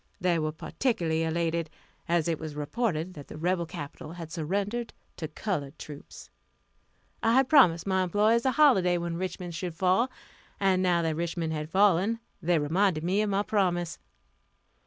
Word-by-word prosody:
They 180 -3 +2
were 155 0 -1
particularly 165 - -1
elated, 165 0 -1 0.4
as 170 -2 +2
it 165 -2 -1
was 155 -2 -6
reported 165 +2 -2
that 145 -4 -10
the - - -9
rebel 170 +1 0
capital 150 +1 -8
had 165 -2 -8
surrendered 200 +8 -2 0.2
to 160 - -4
colored 155 -3 -4
troops. 145 -1 -11 0.9
I 225 - +3
had 265 +1 +4
promised 210 - +5
my 190 -1 +1
employees 210 +6 +2
a 260 - +2
holiday 195 -13 +4
when 170 -1 -3
Richmond 180 -1 -4
should 165 +1 -4
fall; 190 +8 +2 0.5
and 190 -2 +3
now 175 -2 +2
that 160 -1 0
Richmond 165 -1 -2
had 155 0 -4
fallen, 200 +3 +3 0.2
they 175 0 +2
reminded 160 +2 +1
me 190 +4 +1
of 215 - 0
my 200 +1 +1
promise. 175 -5 0
175 Hz, 160 wpm, -28 LUFS, 160-200 Hz, 0.9 s, promised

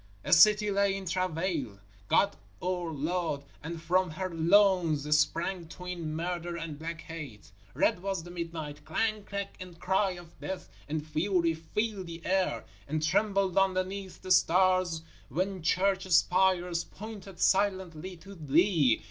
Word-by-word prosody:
_ - - -28 0.2
A - - +4
city 210 +4 +6
lay 200 0 +2
in 195 - -7
travail, 170 - -2 0.3
God 200 - +3 0.2
our 180 -2 -2
Lord, 155 -1 -2 0.2
and 165 +2 -5
from 180 +2 +1
her 185 +3 -4
loins 170 -3 +4
sprang 165 +3 0
twin 175 -2 -5
Murder 175 +1 -3
and 165 -3 -6
Black 165 +1 -5
Hate. 140 -12 -9 0.2
Red 175 - +2
was 195 -3 -2
the 175 - -10
midnight; 165 -4 -6
clang, 215 +7 -1
crack 200 -1 -5
and 180 -2 -10
cry 190 0 +1
of 175 -2 -13
death 190 - -5 0.2
and 155 0 -2
fury 170 +2 +1
filled 195 +4 -3
the 170 0 -9
air 185 -12 0 0.2
and 155 +1 -1
trembled 195 +3 +2
underneath 190 0 -1
the 185 - -4
stars 185 -2 +3 0.3
when 185 +6 -2
church 190 +3 +1
spires 180 -1 +3
pointed 205 -3 -10
silently 190 -3 +1
to 195 +4 -12
Thee. 160 - +3
180 Hz, 145 wpm, -30 LUFS, 160-190 Hz, 0.3 s, city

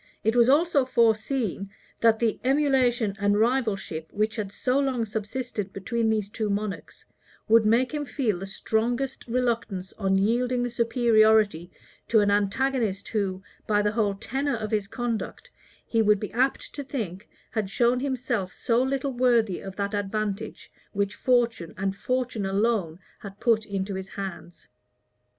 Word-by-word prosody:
It 220 +2 +2
was 240 0 +5
also 295 0 +4
foreseen, 230 -4 +1 0.3
that 225 -1 +4
the 225 -1 0
emulation 255 -6 +2
and 205 +1 +2
rivalship, 215 -9 0
which 215 +1 0
had 205 -3 -3
so 255 +5 0
long 260 -4 0
subsisted 215 -1 -4
between 225 +4 -1
these 215 -2 0
two 215 0 -3
monarchs, 205 0 -4 0.4
would 225 -1 +5
make 240 +3 +3
him 295 -1 -2
feel 220 -12 -1
the 195 - -6
strongest 240 +7 -2
reluctance 230 -6 -1
on 195 -2 +2
yielding 245 +5 +1
the 245 - -2
superiority 220 -6 +3 0.4
to 225 - +4
an 205 -1 +3
antagonist 210 +1 0
who, 195 -3 -2 0.2
by 210 -1 +2
the 210 - +2
whole 210 -3 0
tenor 270 +7 -2
of 215 -2 -4
his 210 -2 0
conduct, 235 0 -4 0.3
he 225 - +1
would 210 -1 +4
be 210 - -6
apt 260 +3 0
to 285 - -5
think, 215 -8 -5 0.2
had 215 -4 -2
shown 240 +4 +2
himself 250 -8 -2
so 235 +5 +1
little 270 +1 -1
worthy 235 -6 +2
of 195 -1 -8
that 200 +1 -2
advantage 205 0 -3 0.2
which 200 0 -1
fortune, 235 -10 +1
and 195 0 -1
fortune 250 -3 -2
alone, 195 -4 0 0.2
had 200 -1 -10
put 220 -2 +2
into 195 -1 -3
his 190 0 -5
hands. 190 -3 -8
220 Hz, 155 wpm, -26 LUFS, 200-245 Hz, 0.4 s, was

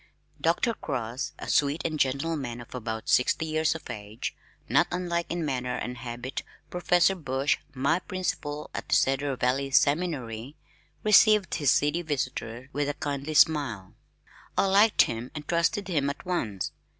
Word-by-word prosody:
Dr. 170 - +2
Cross, 125 - -4
a - - -7
sweet 145 +3 +2
and 155 -2 -1
gentle 140 +5 +1
man 120 -5 -4
of 120 - -11
about 110 -3 -4
sixty 125 +5 +3
years 155 0 +1
of 165 - -8
age 105 -1 -6 0.3
(not - - +4
unlike 175 -1 -1
in 170 -2 -2
manner 125 -3 -2
and 125 0 -5
habit 120 +2 -5 0.3
Professor 180 +1 +3
Bush, 140 -5 0 0.2
my 140 +6 +2
principal 150 -6 -4
at - - -6
the - - +4
Cedar 135 +1 +2
Valley 130 +2 0
Seminary) 140 -4 +1 0.5
received 215 -2 +5
his 145 -5 +2
seedy 150 +5 +2
visitor 130 -5 -3
with 145 0 0
a 145 - -2
kindly 145 +1 -3
smile. 135 -13 +3 0.6
I - - +4
liked 205 +3 +5
him 115 +2 -4
and 150 -1 -7
trusted 180 +4 +1
him 145 -6 +1
at 140 - -6
once. 110 - -2
145 Hz, 155 wpm, -27 LUFS, 125-170 Hz, 0.6 s, received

